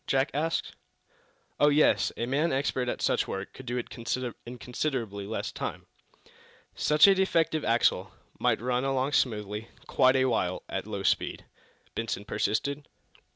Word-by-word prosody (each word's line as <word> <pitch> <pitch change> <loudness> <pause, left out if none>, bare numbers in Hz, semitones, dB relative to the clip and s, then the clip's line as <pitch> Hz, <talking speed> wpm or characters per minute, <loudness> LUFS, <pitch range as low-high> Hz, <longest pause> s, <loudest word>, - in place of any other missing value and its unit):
Jack 135 +1 +2
asked. 160 +3 -1 0.9
"Oh, 145 - +6
yes; 150 +1 +4
a 115 - -1
man 145 +7 +1
expert 130 -2 0
at - - -3
such - - +2
work 95 0 -5
could 130 - -12
do 120 +1 -2
it 120 - -2 0.6
in 125 +1 -7
considerably 120 -6 -3
less 110 - -3
time." - - -5 0.9
"Such 150 0 +5
a 200 - +7
defective 165 -5 +1
axle 115 +1 +2 0.3
might - - +2
run 125 +1 0
along 135 0 0
smoothly, 105 -4 0 0.2
quite 130 +1 +4
a 130 0 +3
while 95 -8 0
at 95 +2 -4
low 100 -2 -4
speed?" - - 0 0.5
Benson 110 -2 -3
persisted. 140 +9 -1
130 Hz, 150 wpm, -28 LUFS, 110-145 Hz, 0.9 s, a